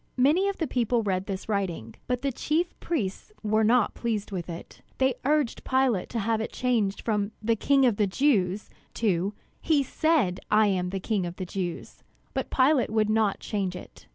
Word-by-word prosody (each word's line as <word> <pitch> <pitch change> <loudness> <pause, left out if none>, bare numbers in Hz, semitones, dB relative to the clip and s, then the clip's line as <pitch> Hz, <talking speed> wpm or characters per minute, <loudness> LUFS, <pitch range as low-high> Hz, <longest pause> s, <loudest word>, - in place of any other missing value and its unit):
Many 305 +10 +4
of 395 - -4
the 325 - 0
people 240 -3 0
read 190 -2 -1
this 195 -2 -4
writing; 180 - -2
but 250 +1 -1
the 275 - +1
chief 320 +7 -1
priests 240 - -3
were 215 +1 +2
not 230 0 +3
pleased 220 -3 -3
with 180 -2 -4
it. 170 0 -9 0.2
They 265 0 +3
urged 295 -3 +1
Pilate 260 -7 +1
to 235 - -4
have 220 +1 0
it 220 - -4
changed 225 -6 0
from 210 -1 -1
"The 225 +1 +1
King 275 +4 +3
of 235 -5 +2
the 210 - +2
Jews" 200 -4 +1 0.2
to 200 -2 0 0.3
"He 300 -3 +3
said, 270 - +1
I 215 +1 +5
am 180 -2 0
King 195 0 -1
of 175 - -7
the 185 - -5
Jews." 175 -1 -5 0.3
But - - -2
Pilate 265 0 +3
would 215 -1 +1
not 215 -2 +1
change 195 -3 -2
it. 180 - -12
220 Hz, 185 wpm, -27 LUFS, 195-260 Hz, 0.3 s, I